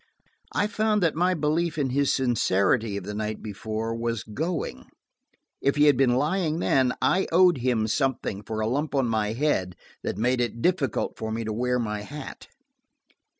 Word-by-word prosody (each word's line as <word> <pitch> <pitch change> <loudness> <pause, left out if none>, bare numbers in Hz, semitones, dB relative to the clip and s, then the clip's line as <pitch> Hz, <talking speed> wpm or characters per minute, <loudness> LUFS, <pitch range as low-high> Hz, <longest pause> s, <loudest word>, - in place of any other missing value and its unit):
I 205 - +2
found 210 -1 +1
that 165 - +3
my 180 +3 +2
belief 160 +2 0
in 135 -4 0
his 140 +1 +2
sincerity 110 -3 +1
of 100 - -5
the 105 +3 -5
night 110 0 -4
before 110 +2 -4
was 115 -3 -2
going. 145 - -4 0.7
If 140 - +2
he 145 - +4
had 145 -2 +6
been 125 -1 +3
lying 155 +3 0
then, 130 -6 +2
I 190 - +2
owed 175 -3 +5
him 120 -3 +1
something 115 -4 -1
for 110 +1 -4
a 110 - 0
lump 145 +5 -1
on 135 -2 +2
my 110 -2 0
head 115 -9 0 0.3
that - - -3
made 125 +2 +1
it 120 -1 -2
difficult 150 - 0
for 110 0 -3
me 115 +1 -2
to 110 -1 -3
wear 125 +3 0
my 105 -3 -2
hat. 145 +6 -9
125 Hz, 180 wpm, -26 LUFS, 110-150 Hz, 0.7 s, had